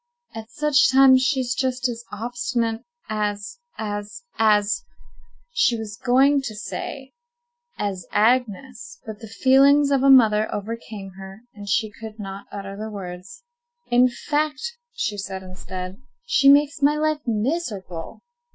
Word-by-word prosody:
At 225 0 -8
such 295 -1 +3
times 260 -1 +7
she's 260 -2 +1
just 255 0 -1
as 240 -1 -6
obstinate 235 +1 -2 0.3
as—as—as"— 210 - -2 0.7
She 460 - +2
was 215 -2 -7
going 270 +3 +4
to 225 -5 -6
say 265 +5 -6 0.7
"as 190 -4 -3
Agnes," 250 - 0
but 215 -2 -8
the 225 - -9
feelings 275 +6 +4
of 275 -2 +3
a 275 - +4
mother 220 -5 +5
overcame 210 -2 -6
her, 195 +2 -10
and 205 -1 -9
she 220 +1 +1
could 220 0 -10
not 195 -1 -8
utter 195 -1 -7
the 215 +2 -6
words. 195 - -9 0.5
"In 250 +1 +5
fact," 300 - -2 0.2
she 220 - -3
said 190 -1 -5
instead, 185 +2 -8 0.2
"she 275 - +4
makes 290 +2 +4
my 290 +2 +4
life 310 0 0
miserable." 215 - -3
230 Hz, 130 wpm, -23 LUFS, 205-275 Hz, 0.7 s, times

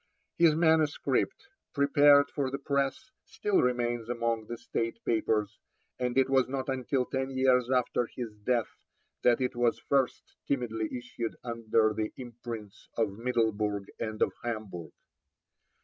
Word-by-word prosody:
His 165 -3 +6
manuscript, 160 - +1 0.3
prepared 145 0 +5
for 140 -3 -1
the 135 - -3
press, 140 - -1
still 205 -2 0
remains 120 -2 0
among 115 -2 -1
the 120 - -5
State 115 0 -3
Papers, 110 -2 0 0.4
and 125 0 -1
it 135 - +5
was 135 -1 +2
not 135 0 -3
until 130 0 0
ten 130 +1 -2
years 130 -2 +3
after 125 -2 +1
his 120 -3 -6
death 120 -1 0 0.5
that 120 -1 +4
it 125 -1 -1
was 120 -1 +2
first 135 -2 -1
timidly 115 -5 -1
issued 120 -2 -5
under 115 -2 +1
the 110 0 -2
imprints 120 -4 -8
of 110 -3 +1
Middelburg 110 -4 0
and 110 -1 -4
of - - 0
Hamburg. 110 -7 -5
120 Hz, 135 wpm, -29 LUFS, 115-135 Hz, 0.5 s, His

